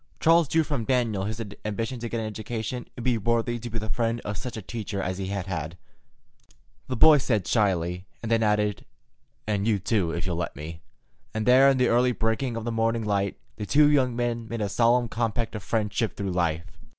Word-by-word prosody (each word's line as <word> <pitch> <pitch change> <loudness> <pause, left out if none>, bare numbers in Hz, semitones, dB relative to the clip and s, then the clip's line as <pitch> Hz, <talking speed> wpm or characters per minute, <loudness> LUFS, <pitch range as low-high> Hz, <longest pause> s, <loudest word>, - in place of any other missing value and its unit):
Charles 165 -1 +5
drew 160 +3 +2
from 145 -6 -2
Daniel 115 -6 +1
his 110 +2 -4 0.2
ambition 115 +4 -3
to 120 0 -4
get 115 - -2
an 110 - -3
education 110 +3 -4
and 120 - -6
be 120 -2 +1
worthy 115 +2 0
to 120 +1 -6
be 115 - -4
the 110 -1 -3
friend 115 +2 0
of 105 - -4
such 125 +1 -6
a - - -5
teacher 105 -2 -5
as 95 0 -2
he 95 - -3
had 100 -2 -3
had. 85 -2 -4 1.1
The 130 - -2
boy 150 +4 +7
said 110 -3 +1
it - - -12
shyly, 90 -4 0 0.2
and 115 - -3
then 115 0 +3
added, 105 -2 +1 0.6
"And 105 -1 0
you 110 -3 +3
too, 100 -2 0
if 85 +1 -3
you'll 90 -3 -2
let 85 - -3
me," 80 +3 -8 0.5
and 110 -1 -1
there 130 +2 +7
in 135 - +3
the 125 -1 +3
early 125 +1 +3
breaking 115 +2 -1
of 115 - -4
the 120 - -1
morning 115 0 0
light 100 -1 0 0.2
the 105 - -5
two 150 +1 +5
young 130 -4 +2
men 120 -1 -2
made 115 -1 -3
a 105 - -1
solemn 120 +3 +3
compact 115 0 -2
of 105 - -5
friendship 110 +2 -1
through 100 -2 -2
life. 85 -2 0
115 Hz, 220 wpm, -26 LUFS, 100-120 Hz, 1.1 s, boy